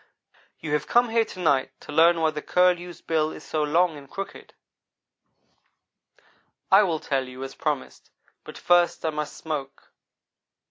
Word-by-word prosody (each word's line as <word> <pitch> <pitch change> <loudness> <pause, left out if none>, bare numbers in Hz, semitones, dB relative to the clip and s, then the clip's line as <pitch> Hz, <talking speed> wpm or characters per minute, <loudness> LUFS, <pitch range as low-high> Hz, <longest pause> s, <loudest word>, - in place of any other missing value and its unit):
"You 150 -2 -4
have 150 - -1
come 240 0 +3
here 225 0 +2
to 185 - -11
night 135 -6 +1
to - - -10
learn 165 +3 +5
why 160 -1 +2
the 150 -1 -5
Curlew's 180 0 +1
bill 155 -1 0
is - - -10
so 155 - -2
long 160 +2 +2
and 140 -1 -13
crooked. 195 0 -8 2.2
I 195 +2 +8
will 170 -6 0
tell 135 -3 -2
you, 130 +1 -8
as 135 0 -7
I - - -23
promised, 150 -3 -4 0.3
but - - -11
first 175 -1 +2
I 160 - +1
must 150 -1 -5
smoke." 140 -4 -6
160 Hz, 160 wpm, -25 LUFS, 145-175 Hz, 2.2 s, I